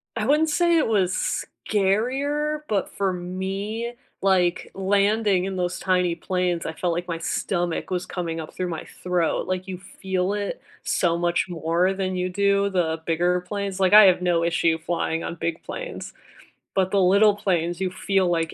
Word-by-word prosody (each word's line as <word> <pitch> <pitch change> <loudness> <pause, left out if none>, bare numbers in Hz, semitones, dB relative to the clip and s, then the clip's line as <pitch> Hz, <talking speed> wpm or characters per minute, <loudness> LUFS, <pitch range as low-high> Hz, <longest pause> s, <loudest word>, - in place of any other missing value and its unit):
I 215 - -1
wouldn't 305 +3 +3
say 340 +1 +3
it 300 - +2
was 190 -4 0 0.3
scarier, 270 +10 +1
but 200 -3 0
for 195 -2 -1
me, 195 +6 -4 0.3
like, 185 -2 +2
landing 200 0 +2
in 195 -1 -3
those 180 0 -2
tiny 180 -2 +1
planes, 180 0 -1
I 160 - -3
felt 175 +1 -1
like 175 +1 -3
my 165 -2 -3
stomach 175 0 -2
was 180 -1 -1
coming 165 -2 -4
up 155 - -7
through 180 -1 -2
my 165 - -5 0.2
throat, 180 -3 0
like, 185 0 -2
you 185 - -5
feel 190 0 -2
it 205 -1 -3 0.2
so 170 -2 +1
much 175 +1 +1
more 170 +3 +1
than 190 -1 -2
you 180 0 -1
do 200 +1 +2
the 165 -3 0
bigger 175 +2 +1
planes 195 +1 -4
like, 190 0 +3
I 215 0 +10
have 185 -1 +4
no 175 -2 +2
issue 165 -1 +2
flying 165 0 -2
on 170 - -4
big 165 0 -3
planes, - - -6 0.6
but 190 -1 +1
the 200 - +3
little 200 +3 +5
planes, 175 -3 -1
you 185 - +1
feel, 190 0 +1
like, 165 -1 0
185 Hz, 180 wpm, -24 LUFS, 175-200 Hz, 0.6 s, I